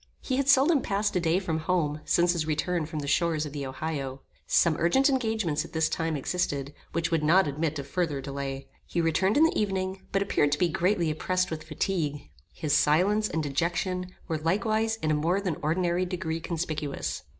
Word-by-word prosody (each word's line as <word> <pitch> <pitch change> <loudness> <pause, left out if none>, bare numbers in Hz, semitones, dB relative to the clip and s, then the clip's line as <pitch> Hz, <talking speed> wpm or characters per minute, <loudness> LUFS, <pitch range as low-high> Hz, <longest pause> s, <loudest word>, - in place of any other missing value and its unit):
He 260 - -2
had 275 0 +1
seldom 280 +2 +5
passed 205 0 -1
a - - +3
day 170 0 +2
from 165 -4 -1
home 155 -3 0
since 175 0 +3
his 160 -3 -2
return 160 +1 -1
from 155 -1 -4
the 140 - -5
shores 155 +1 +1
of 145 - -7
the 140 -2 -4
Ohio. 135 -1 -4 0.3
Some 170 -2 +4
urgent 265 - +4
engagements 220 - 0
at - - -12
this 160 -1 +2
time 160 -2 -1
existed, 145 -2 -2 0.2
which 170 +1 -1
would 165 -2 +2
not 170 +3 +4
admit 150 +2 -2
of 140 - -5
further 160 -3 -1
delay. 135 0 -5 0.2
He 175 - -2
returned 170 - +2
in 305 - +6
the 325 - +3
evening, 190 -2 -1
but 195 0 +2
appeared 145 -7 +1
to - - +1
be 175 +2 +2
greatly 175 -1 +1
oppressed 185 +4 -1
with 160 -1 -4
fatigue. 155 -2 -2 0.2
His 150 -2 -2
silence 195 +9 +3
and 160 - -1
dejection 180 +5 -2
were 160 -3 -2
likewise 215 +7 +1
in 155 - +2
a - - +3
more 165 +6 +1
than 185 -6 -2
ordinary 175 +3 0
degree 170 -3 -3
conspicuous. 155 -4 -3
165 Hz, 195 wpm, -27 LUFS, 150-185 Hz, 0.3 s, in